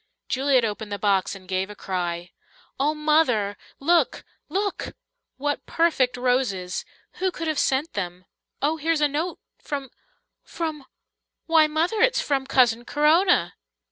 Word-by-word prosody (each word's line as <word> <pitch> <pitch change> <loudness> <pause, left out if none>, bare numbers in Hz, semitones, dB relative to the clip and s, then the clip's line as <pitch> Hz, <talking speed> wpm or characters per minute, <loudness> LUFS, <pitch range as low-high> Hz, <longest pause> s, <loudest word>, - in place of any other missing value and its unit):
Juliet 265 -2 +2
opened 210 0 -4
the 205 - -2
box 200 -1 +1
and 185 -1 -13
gave 190 +1 -1
a 210 - -9
cry. 175 -3 -3 0.5
"Oh, 295 +3 +2
Mother, 300 -10 +2 0.2
look 335 +4 +2 0.3
look! 395 +4 -2 0.4
What 290 +2 -2
perfect 290 -7 +2
roses! 245 -8 0 0.3
Who 375 - +1
could 330 -2 -5
have 310 -2 0
sent 275 +5 +1
them? 180 -2 -4 0.4
Oh, 310 +3 +2
here's 320 0 0
a 295 - +5
note 315 +5 -2 0.2
from 275 -3 -5 0.5
from 315 -4 -5 0.6
why, 320 -2 +5
Mother, 330 +8 0
it's - - +4
from 270 -2 -1
Cousin 240 -3 +3
Corona." 315 +8 +3
275 Hz, 140 wpm, -24 LUFS, 210-320 Hz, 0.6 s, a